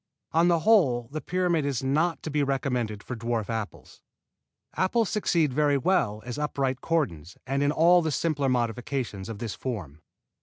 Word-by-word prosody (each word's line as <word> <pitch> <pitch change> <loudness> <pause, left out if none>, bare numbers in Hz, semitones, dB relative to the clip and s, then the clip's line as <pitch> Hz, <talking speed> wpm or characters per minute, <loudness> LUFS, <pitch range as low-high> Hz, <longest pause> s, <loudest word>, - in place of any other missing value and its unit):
On 165 +2 +3
the 170 -2 +3
whole 140 - +3
the 155 +1 -4
pyramid 175 0 0
is 140 -3 -2
not 155 +6 0
to 155 - -4
be 150 0 +1
recommended 125 -6 -1
for 125 - -5
dwarf 115 -1 -2
apples. 110 -2 -6 0.7
Apples 215 +2 +1
succeed 170 - +1
very 145 0 +3
well 125 - +1
as 125 +3 -5
upright 135 -3 -1
cordons 95 - -2
and 135 +1 -1
in 145 0 +2
all 175 +3 +5
the 160 - -1
simpler 145 -1 0
modifications 120 -3 -2
of 110 - -5
this 115 -1 -4
form. 90 - -6
140 Hz, 165 wpm, -27 LUFS, 120-160 Hz, 0.7 s, all